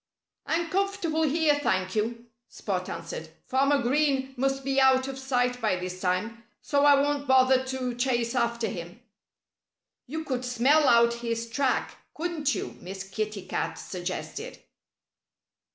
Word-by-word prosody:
"I'm 335 Hz, +1 st, 0 dB
comfortable 390 Hz, -5 st, 0 dB
here, 310 Hz, -1 st, +3 dB
thank 185 Hz, -6 st, 0 dB
you," 230 Hz, +2 st, -1 dB, 0.2 s
Spot 185 Hz, -3 st, -3 dB
answered. 165 Hz, -1 st, -6 dB, 0.2 s
"Farmer 275 Hz, +1 st, +2 dB
Green 270 Hz, 0 st, +1 dB
must 270 Hz, +1 st, 0 dB
be 270 Hz, 0 st, +2 dB
out 260 Hz, 0 st, +4 dB
of 270 Hz, 0 st, -6 dB
sight 250 Hz, -2 st, 0 dB
by 215 Hz, -4 st, +2 dB
this 180 Hz, 0 st, -6 dB
time. 210 Hz, +6 st, -1 dB, 0.2 s
So 285 Hz, 0 st, +1 dB
I 285 Hz, -1 st, +7 dB
won't 285 Hz, 0 st, 0 dB
bother 260 Hz, 0 st, +5 dB
to 260 Hz, -1 st, -3 dB
chase 240 Hz, -1 st, 0 dB
after 235 Hz, -2 st, 0 dB
him." 175 Hz, +2 st, -7 dB, 1.1 s
"You 315 Hz, +5 st, -4 dB
could 255 Hz, -4 st, -3 dB
smell 260 Hz, +5 st, +3 dB
out 235 Hz, 0 st, +5 dB
his 230 Hz, -1 st, -3 dB
track, 260 Hz, +3 st, -1 dB, 0.2 s
couldn't 310 Hz, -5 st, -1 dB
you?" -, -, -5 dB
Miss 190 Hz, +2 st, -6 dB
Kitty 205 Hz, 0 st, -4 dB
Cat -, -, -3 dB
suggested. 180 Hz, 0 st, -5 dB
255 Hz, 140 wpm, -27 LUFS, 225-280 Hz, 1.1 s, I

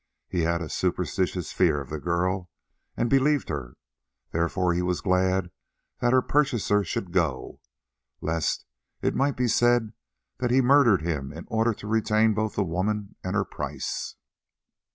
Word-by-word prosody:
He 90 Hz, -, -2 dB
had 85 Hz, +1 st, 0 dB
a -, -, -5 dB
superstitious 90 Hz, 0 st, -1 dB
fear 80 Hz, -6 st, +2 dB
of 70 Hz, -1 st, -8 dB
the 75 Hz, -, -3 dB
girl, 90 Hz, +2 st, -1 dB, 0.5 s
and 120 Hz, -, +1 dB
believed 135 Hz, +2 st, +2 dB
her; 70 Hz, -6 st, -5 dB, 0.6 s
therefore 85 Hz, +2 st, +1 dB
he 90 Hz, -, 0 dB
was 90 Hz, 0 st, 0 dB
glad 95 Hz, -1 st, +1 dB, 0.5 s
that 120 Hz, -, +2 dB
her 130 Hz, -1 st, +4 dB
purchaser 120 Hz, -8 st, +2 dB
should 90 Hz, 0 st, -4 dB
go, 80 Hz, -8 st, -1 dB, 0.6 s
lest 80 Hz, -1 st, -1 dB, 0.4 s
it -, -, +2 dB
might 140 Hz, 0 st, +1 dB
be 125 Hz, 0 st, +1 dB
said 120 Hz, -1 st, +3 dB, 0.5 s
that 125 Hz, -, 0 dB
he 125 Hz, -, +3 dB
had 130 Hz, -, +4 dB
murdered 125 Hz, -, +5 dB
him 75 Hz, -5 st, -2 dB
in 80 Hz, +2 st, -9 dB
order 110 Hz, 0 st, +1 dB
to -, -, -11 dB
retain 110 Hz, 0 st, +2 dB
both 110 Hz, +1 st, -2 dB
the 100 Hz, -, +1 dB
woman 100 Hz, +4 st, -2 dB
and 95 Hz, +2 st, -2 dB
her 100 Hz, -1 st, +1 dB
price. 75 Hz, -2 st, -5 dB
95 Hz, 160 wpm, -26 LUFS, 85-110 Hz, 0.6 s, murdered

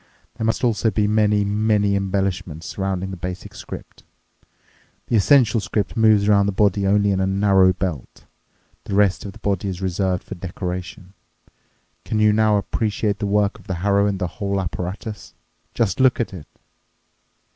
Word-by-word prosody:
There 110 Hz, -, -4 dB
must 115 Hz, -, -1 dB
also 115 Hz, -1 st, +2 dB
be 105 Hz, 0 st, 0 dB
many, 105 Hz, -1 st, +2 dB
many 105 Hz, -1 st, +1 dB
embellishments 95 Hz, -4 st, -2 dB
surrounding 95 Hz, -1 st, -3 dB
the 95 Hz, -, -6 dB
basic 90 Hz, +2 st, -6 dB
script. -, -, -10 dB, 1.0 s
The -, -, -1 dB
essential 115 Hz, 0 st, +4 dB
script 105 Hz, 0 st, -2 dB
moves 110 Hz, -3 st, +4 dB
around 100 Hz, -1 st, +4 dB
the -, -, +1 dB
body 100 Hz, 0 st, +1 dB
only 100 Hz, 0 st, +3 dB
in 95 Hz, -, 0 dB
a 95 Hz, -, +1 dB
narrow 95 Hz, -1 st, +4 dB
belt. 90 Hz, -8 st, -5 dB, 0.6 s
The 100 Hz, -, -3 dB
rest 100 Hz, -1 st, +2 dB
of 100 Hz, -, -7 dB
the -, -, -13 dB
body 100 Hz, -1 st, -2 dB
is 90 Hz, -2 st, -4 dB
reserved 95 Hz, 0 st, -1 dB
for -, -, -8 dB
decoration. 90 Hz, 0 st, -6 dB, 0.9 s
Can 110 Hz, -, -2 dB
you 105 Hz, -1 st, +4 dB
now 110 Hz, -1 st, +3 dB
appreciate 105 Hz, 0 st, -1 dB
the 105 Hz, -, -2 dB
work 105 Hz, +3 st, +1 dB
of 100 Hz, -, -19 dB
the 95 Hz, -, -2 dB
harrow 100 Hz, 0 st, +3 dB
and 100 Hz, -1 st, -1 dB
the 90 Hz, -, -2 dB
whole 100 Hz, +1 st, -3 dB
apparatus? 95 Hz, +4 st, -5 dB, 0.4 s
Just 100 Hz, -6 st, 0 dB
look 130 Hz, -1 st, +4 dB
at 115 Hz, -, -2 dB
it!" 80 Hz, -6 st, -9 dB
100 Hz, 165 wpm, -21 LUFS, 95-105 Hz, 1.0 s, essential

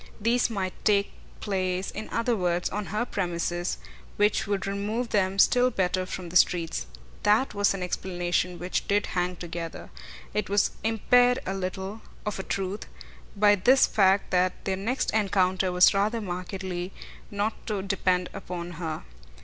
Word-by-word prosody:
These 235 Hz, +4 st, +2 dB
might 190 Hz, -4 st, -2 dB
take 200 Hz, -1 st, +3 dB, 0.3 s
place, 185 Hz, -2 st, -1 dB
in 215 Hz, -, -6 dB
other 230 Hz, +1 st, +1 dB
words, 175 Hz, -3 st, 0 dB
on 205 Hz, +1 st, -3 dB
her 215 Hz, +4 st, -1 dB
premises, 175 Hz, -3 st, -2 dB, 0.4 s
which 205 Hz, 0 st, +2 dB
would 200 Hz, -1 st, -1 dB
remove 210 Hz, +5 st, -2 dB
them 195 Hz, -2 st, +1 dB
still 250 Hz, +5 st, +5 dB
better 185 Hz, -4 st, 0 dB
from 185 Hz, -2 st, -6 dB
the 175 Hz, -, -10 dB
streets. 165 Hz, -, +2 dB, 0.3 s
THAT 215 Hz, +6 st, +3 dB
was 200 Hz, -1 st, +2 dB
an 185 Hz, -, -4 dB
explanation 180 Hz, 0 st, -1 dB
which 180 Hz, +2 st, -2 dB
did 205 Hz, +1 st, +2 dB
hang 180 Hz, 0 st, 0 dB
together. 170 Hz, -1 st, -6 dB, 0.4 s
It 210 Hz, -, -1 dB
was 205 Hz, 0 st, +3 dB
impaired 245 Hz, +3 st, +4 dB
a 190 Hz, -, -2 dB
little, 190 Hz, +2 st, -4 dB, 0.2 s
of 210 Hz, -2 st, -3 dB
a -, -, -3 dB
truth, 195 Hz, +2 st, -3 dB, 0.5 s
by 205 Hz, 0 st, +5 dB
this 245 Hz, +7 st, +5 dB
fact 195 Hz, -1 st, +3 dB
that 185 Hz, 0 st, +1 dB
their 190 Hz, -, 0 dB
next 225 Hz, +7 st, -1 dB
encounter 190 Hz, -3 st, +2 dB
was 180 Hz, +2 st, +6 dB
rather 210 Hz, +4 st, +1 dB
markedly 185 Hz, -1 st, -4 dB, 0.4 s
not 205 Hz, +2 st, -3 dB
to 205 Hz, -4 st, -2 dB
depend 185 Hz, -2 st, +1 dB
upon 175 Hz, -3 st, -6 dB
her. 160 Hz, -2 st, -3 dB
195 Hz, 155 wpm, -27 LUFS, 180-210 Hz, 0.5 s, was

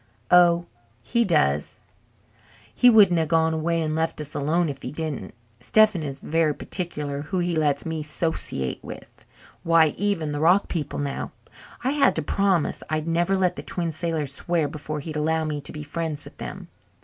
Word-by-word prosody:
"Oh, 175 Hz, -1 st, +6 dB, 0.4 s
he 235 Hz, -, +2 dB
does! 110 Hz, -, +1 dB, 0.9 s
He 245 Hz, -, +6 dB
wouldn't 200 Hz, -7 st, +6 dB
have 160 Hz, -, 0 dB
gone 160 Hz, +1 st, +2 dB
away 165 Hz, +1 st, 0 dB
and 155 Hz, 0 st, -1 dB
left 160 Hz, 0 st, -1 dB
us 150 Hz, -1 st, -6 dB
alone 160 Hz, +4 st, +1 dB
if 140 Hz, -2 st, -5 dB
he 125 Hz, -, -5 dB
didn't. 155 Hz, -2 st, -5 dB, 0.2 s
Stephen 215 Hz, -5 st, +3 dB
is 140 Hz, -3 st, -4 dB
very 155 Hz, +1 st, 0 dB
particular 150 Hz, -6 st, -4 dB
who 170 Hz, +6 st, -4 dB
he 175 Hz, -1 st, 0 dB
lets 150 Hz, -3 st, +1 dB
me 160 Hz, -1 st, -3 dB
'sociate 150 Hz, -, -3 dB
with. -, -, -11 dB, 0.3 s
Why, 165 Hz, -1 st, +4 dB
even 200 Hz, -7 st, 0 dB
the 145 Hz, -, -3 dB
rock 175 Hz, +6 st, +4 dB
people 150 Hz, -5 st, -3 dB
now 140 Hz, -1 st, -3 dB, 0.5 s
I 260 Hz, -, +1 dB
had 285 Hz, -1 st, +3 dB
to 160 Hz, -, -1 dB
promise 190 Hz, 0 st, +1 dB
I'd 155 Hz, +1 st, -2 dB
never 175 Hz, +3 st, +1 dB
let 180 Hz, -1 st, +1 dB
the -, -, -4 dB
Twin 170 Hz, -2 st, -3 dB
Sailors 155 Hz, -3 st, -2 dB
swear 165 Hz, +1 st, 0 dB
before 150 Hz, 0 st, -5 dB
he'd 155 Hz, +1 st, -5 dB
allow 160 Hz, +1 st, +1 dB
me 150 Hz, -1 st, -2 dB
to 145 Hz, -, -8 dB
be 150 Hz, -, -7 dB
friends 150 Hz, 0 st, -4 dB
with -, -, -13 dB
them. -, -, -7 dB
160 Hz, 180 wpm, -24 LUFS, 150-175 Hz, 0.9 s, Oh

